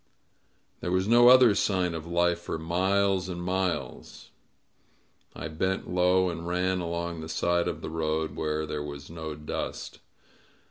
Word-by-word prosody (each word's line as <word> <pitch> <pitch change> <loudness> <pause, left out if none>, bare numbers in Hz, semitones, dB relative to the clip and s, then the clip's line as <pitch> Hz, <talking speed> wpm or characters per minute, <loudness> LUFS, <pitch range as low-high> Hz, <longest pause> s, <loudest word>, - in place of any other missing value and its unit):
There 90 - -4
was 95 +1 +1
no 120 +2 +6
other 125 -3 +8
sign 90 -4 0
of 80 0 -6
life 85 0 +1
for 85 - -4
miles 95 +3 +1
and 90 -1 -5
miles. 90 -7 -3 1.0
I - - -5
bent 95 +4 -2
low 90 +1 +3
and 85 -1 -5
ran 90 +1 0
along 85 -1 -3
the 80 - -8
side 85 +2 +1
of 80 -2 -4
the - - -5
road, 80 -1 -2
where 75 0 -2
there 75 -1 -4
was 70 0 -8
no 80 -2 -6
dust. 75 +1 -5
85 Hz, 150 wpm, -27 LUFS, 80-95 Hz, 1.0 s, other